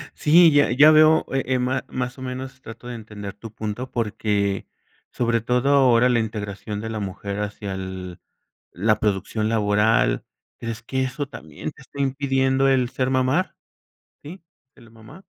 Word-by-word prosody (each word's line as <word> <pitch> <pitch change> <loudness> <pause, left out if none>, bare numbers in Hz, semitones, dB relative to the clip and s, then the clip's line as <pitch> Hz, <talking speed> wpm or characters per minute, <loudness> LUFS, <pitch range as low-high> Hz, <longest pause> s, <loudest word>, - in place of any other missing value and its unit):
Sí, 165 +2 +6
ya 145 -4 +4
ya 145 +5 +7
veo, 155 +1 +5
eh 135 0 0
eh, 130 -1 +1
má 130 +1 -1
más 125 0 -4
o - - -11
menos 130 +1 -6
trato 115 +1 -11
de 120 - -5
entender 105 -2 -8
tu 110 +1 -10
punto, 110 +4 -5
porque 105 -3 -1 0.4
sobre 115 -2 0
todo 125 +3 +1
ahora 125 -3 +5
la 120 -1 +3
integración 105 -1 -4
de 110 - -5
la 110 -1 -4
mujer 100 +1 -5
hacia 105 -1 -5
el 95 -2 -7 0.5
la 105 +3 +1
producción 105 +1 -1
laboral, 105 - +2 0.3
¿crees 115 0 -6
que 130 +2 -2
eso 135 +2 -3
también 80 - -8
te - - -17
está 140 - -10
impidiendo 135 -1 +1
el 130 -2 +2
ser 130 0 -1
mamá? 130 +7 +1 0.7
¿Sí? 170 +5 -10 0.3
¿Ser 115 -4 -18
mamá? 115 +11 -15
120 Hz, 165 wpm, -23 LUFS, 105-130 Hz, 0.7 s, ya